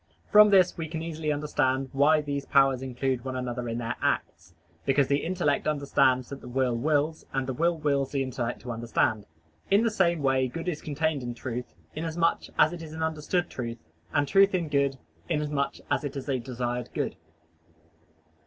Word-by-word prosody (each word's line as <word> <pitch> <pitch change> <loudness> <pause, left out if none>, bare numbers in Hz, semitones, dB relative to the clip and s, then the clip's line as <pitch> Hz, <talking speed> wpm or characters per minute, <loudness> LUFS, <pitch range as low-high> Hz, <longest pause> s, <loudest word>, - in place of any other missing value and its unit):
From 210 0 +8
this 185 -3 +4
we 160 - -3
can 160 +1 -5
easily 160 -2 -2
understand 140 -3 0
why 150 +3 +4
these 140 -1 -4
powers 135 -2 +4
include 130 -1 -2
one 130 -1 -4
another 125 -1 -3
in 115 - -2
their 120 0 -3
acts, 85 0 -2 0.3
because 135 0 +3
the 140 0 +1
intellect 170 -5 0
understands 140 -4 +2
that 140 - -7
the - - -10
will 125 -1 0
wills, 150 +5 0
and 135 -1 0
the 130 - -3
will 170 +5 +1
wills 140 -3 0
the 140 -1 0
intellect 120 -2 -3
to 125 - -6
understand. 115 -2 0 0.4
In 200 +3 +4
the 230 - +2
same 170 -6 +1
way 135 -1 +2
good 165 +7 -6
is 165 -4 -2
contained 155 0 -1
in 120 -1 -5
truth, 125 0 -6 0.2
inasmuch 165 +1 0
as 155 - +5
it 175 - -7
is 160 -1 -8
an 160 0 -3
understood 160 +3 -1
truth, 115 -2 -5 0.3
and 145 -1 +1
truth 195 +4 +5
in 170 -4 -1
good, 140 -2 +1 0.3
inasmuch 150 -3 -1 0.2
as - - +1
it 145 -1 -4
is 135 - -6
a 135 -2 0
desired 120 0 -3
good. - - -1
140 Hz, 190 wpm, -27 LUFS, 130-160 Hz, 0.4 s, From